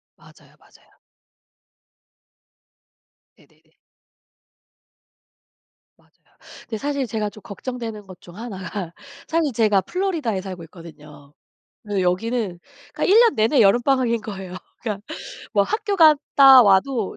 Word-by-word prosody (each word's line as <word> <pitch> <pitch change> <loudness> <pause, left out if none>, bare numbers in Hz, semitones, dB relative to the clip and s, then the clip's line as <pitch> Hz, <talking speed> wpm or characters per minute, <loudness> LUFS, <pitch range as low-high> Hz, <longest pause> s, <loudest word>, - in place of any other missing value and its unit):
맞아요, - - -21
맞아요. - - -25 2.4
네네네. - - -28 2.2
맞아요. - - -30 0.6
근데 225 - -5
사실 280 +2 -2
제가 215 -2 -3
좀 215 - -15
걱정되는 225 -1 -7
것 185 -1 -13
중 175 - -15
1 225 -3 -7
가 185 -5 -6 0.3
사실 320 -3 0
제가 215 -3 +2
플로리다에 330 - -2
살고 185 -3 -8
있거든요. 150 -4 -15 0.5
네 205 -3 -2
여기는 185 +1 -1 0.3
그러니까 - - -4
1 405 +4 +5
년 470 -2 +4
내내 225 +6 +2
여름방학인 240 +2 +2
거예요. 195 -4 -8 0.3
그러니까 210 -3 -5 0.5
뭐 205 -2 +3
학교 410 - -2
갔다 285 -5 +6
와도 210 +2 +1
220 Hz, 250 characters per minute, -21 LUFS, 190-270 Hz, 2.4 s, 갔다